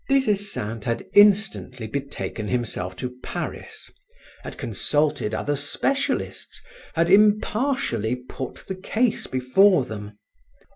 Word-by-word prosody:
Des 275 Hz, -1 st, +3 dB
Esseintes 195 Hz, -, -2 dB
had 115 Hz, -1 st, -2 dB
instantly 200 Hz, -, +4 dB
betaken 135 Hz, -3 st, -4 dB
himself 105 Hz, -7 st, -2 dB
to 125 Hz, +6 st, -5 dB
Paris, -, -, -6 dB, 0.5 s
had -, -, -8 dB
consulted 145 Hz, +3 st, 0 dB
other 145 Hz, +6 st, -1 dB
specialists, 270 Hz, -, -2 dB, 0.4 s
had 165 Hz, +1 st, +3 dB
impartially 210 Hz, -, +2 dB
put 125 Hz, +1 st, -8 dB
the 190 Hz, -, -3 dB
case 215 Hz, +5 st, -1 dB
before 130 Hz, +5 st, +4 dB
them. 105 Hz, -3 st, -8 dB
145 Hz, 105 wpm, -24 LUFS, -, 0.5 s, instantly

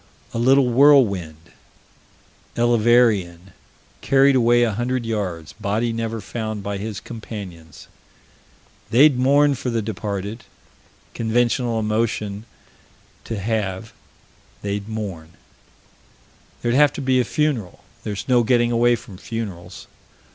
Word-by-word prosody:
A 115 Hz, -, -2 dB
little 135 Hz, +3 st, +4 dB
whirlwind 100 Hz, -, +3 dB, 1.1 s
Elverean 115 Hz, -6 st, +2 dB, 0.5 s
carried 135 Hz, 0 st, +4 dB
away 120 Hz, -1 st, +4 dB
a 115 Hz, -, +1 dB
hundred 120 Hz, +2 st, -2 dB
yards 95 Hz, -8 st, -4 dB
body 110 Hz, +3 st, -2 dB
never 115 Hz, 0 st, -3 dB
found 110 Hz, 0 st, -5 dB
by 100 Hz, 0 st, -4 dB
his 105 Hz, 0 st, -5 dB
companions. 95 Hz, -9 st, -10 dB, 1.0 s
They'd 130 Hz, +3 st, +5 dB
mourn 140 Hz, +3 st, +4 dB
for 125 Hz, -1 st, -4 dB
the 115 Hz, -2 st, -1 dB
departed. 105 Hz, +1 st, -5 dB, 0.7 s
Conventional 120 Hz, 0 st, 0 dB
emotion 105 Hz, -1 st, -2 dB, 0.8 s
to 115 Hz, -, -4 dB
have: 105 Hz, 0 st, -3 dB, 0.7 s
they'd 100 Hz, +1 st, -4 dB
mourn. 95 Hz, -7 st, -6 dB, 1.3 s
There'd 120 Hz, 0 st, +1 dB
have 145 Hz, +2 st, +4 dB
to -, -, -6 dB
be 130 Hz, -1 st, +2 dB
a -, -, +3 dB
funeral: 135 Hz, -, -2 dB, 0.2 s
there's 105 Hz, -2 st, -5 dB
no 125 Hz, -2 st, +4 dB
getting 120 Hz, 0 st, +2 dB
away 120 Hz, +1 st, +3 dB
from 100 Hz, -5 st, -12 dB
funerals. 95 Hz, -6 st, -7 dB
115 Hz, 110 wpm, -21 LUFS, 100-120 Hz, 1.3 s, They'd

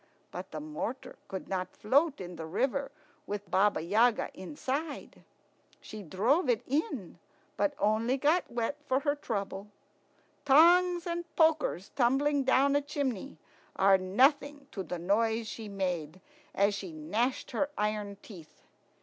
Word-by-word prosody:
But -, -, -7 dB
the -, -, -6 dB
mortar 285 Hz, -4 st, -5 dB
could 190 Hz, -2 st, -6 dB
not 185 Hz, -1 st, -3 dB
float 285 Hz, +7 st, +2 dB
in 180 Hz, -1 st, -7 dB
the 160 Hz, -1 st, -7 dB
river 270 Hz, -, -1 dB, 0.4 s
with 205 Hz, 0 st, -5 dB
Baba 200 Hz, -3 st, +3 dB
Yaga 220 Hz, +7 st, +2 dB
inside. 290 Hz, -, -5 dB, 0.6 s
She 215 Hz, -, -9 dB
drove 230 Hz, -, +1 dB
it 235 Hz, -3 st, +2 dB
in, 275 Hz, -, -2 dB, 0.4 s
but 295 Hz, -1 st, 0 dB
only 220 Hz, +5 st, +1 dB
got 305 Hz, +6 st, +2 dB
wet 240 Hz, +4 st, -2 dB
for 260 Hz, +1 st, +1 dB
her 285 Hz, -1 st, +1 dB
trouble. 200 Hz, -7 st, -4 dB, 0.8 s
Tongs 345 Hz, +5 st, +5 dB
and 345 Hz, 0 st, -2 dB
pokers 315 Hz, -, +2 dB
tumbling 275 Hz, +3 st, +2 dB
down 270 Hz, +2 st, +3 dB
a 285 Hz, -, +3 dB
chimney 280 Hz, -, -3 dB, 0.4 s
are 195 Hz, 0 st, +5 dB
nothing 280 Hz, +9 st, +2 dB
to 195 Hz, -, -4 dB
the 180 Hz, 0 st, -5 dB
noise 220 Hz, +5 st, +1 dB
she 220 Hz, -1 st, -7 dB
made 180 Hz, -4 st, -3 dB, 0.4 s
as 200 Hz, +1 st, +3 dB
she 195 Hz, -3 st, -5 dB
gnashed 210 Hz, -, -2 dB
her 280 Hz, +4 st, 0 dB
iron 210 Hz, -1 st, -2 dB
teeth. 170 Hz, -8 st, -13 dB
235 Hz, 140 wpm, -30 LUFS, 195-285 Hz, 0.8 s, Tongs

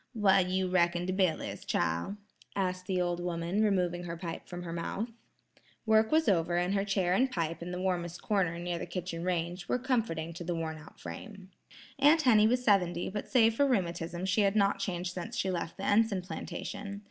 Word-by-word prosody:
"Wha' 195 Hz, -3 st, +5 dB
you 185 Hz, 0 st, +1 dB
reckin 175 Hz, -1 st, +2 dB
de 185 Hz, -, -1 dB
bill 185 Hz, -4 st, +2 dB
is, -, -, -6 dB
chile?" 85 Hz, -, -1 dB, 0.4 s
asked 185 Hz, -2 st, -1 dB
the 185 Hz, -1 st, 0 dB
old 175 Hz, -1 st, 0 dB
woman, 175 Hz, +3 st, -1 dB
removing 180 Hz, -4 st, +1 dB
her 170 Hz, -1 st, -5 dB
pipe 165 Hz, -1 st, -6 dB
from 175 Hz, 0 st, -6 dB
her 165 Hz, -1 st, -5 dB
mouth. 195 Hz, +7 st, -3 dB, 0.8 s
Work 220 Hz, 0 st, +4 dB
was 315 Hz, +1 st, +3 dB
over 175 Hz, -2 st, +2 dB
and 180 Hz, +2 st, +1 dB
her 195 Hz, -1 st, +1 dB
chair 195 Hz, -3 st, +1 dB
and 260 Hz, +7 st, +3 dB
pipe 165 Hz, -6 st, -2 dB
in 170 Hz, -, -5 dB
the 180 Hz, 0 st, -4 dB
warmest 180 Hz, -2 st, -2 dB
corner 190 Hz, -6 st, 0 dB
near 175 Hz, 0 st, -3 dB
the -, -, -5 dB
kitchen 175 Hz, -1 st, -4 dB
range, 175 Hz, 0 st, -2 dB
were -, -, +2 dB
comforting 225 Hz, -11 st, -1 dB
to 175 Hz, -, -7 dB
the 175 Hz, 0 st, -2 dB
wornout 160 Hz, -1 st, -6 dB
frame. 195 Hz, -3 st, -9 dB, 0.5 s
Aunt 305 Hz, +3 st, +6 dB
Henny 215 Hz, -4 st, +6 dB
was 250 Hz, +2 st, +1 dB
seventy, 180 Hz, -6 st, +2 dB
but 210 Hz, +1 st, -5 dB
save 230 Hz, -4 st, +5 dB
for 280 Hz, +5 st, +3 dB
rheumatism 175 Hz, -6 st, -1 dB
she 190 Hz, +3 st, +2 dB
had 200 Hz, 0 st, +2 dB
not 200 Hz, -1 st, +3 dB
changed 180 Hz, -2 st, -2 dB
since 175 Hz, -2 st, -5 dB
she 190 Hz, -, 0 dB
left 170 Hz, -2 st, -4 dB
the 195 Hz, -, -6 dB
Enson 205 Hz, -2 st, +2 dB
plantation. 200 Hz, +1 st, -6 dB
185 Hz, 200 wpm, -31 LUFS, 175-205 Hz, 0.8 s, Aunt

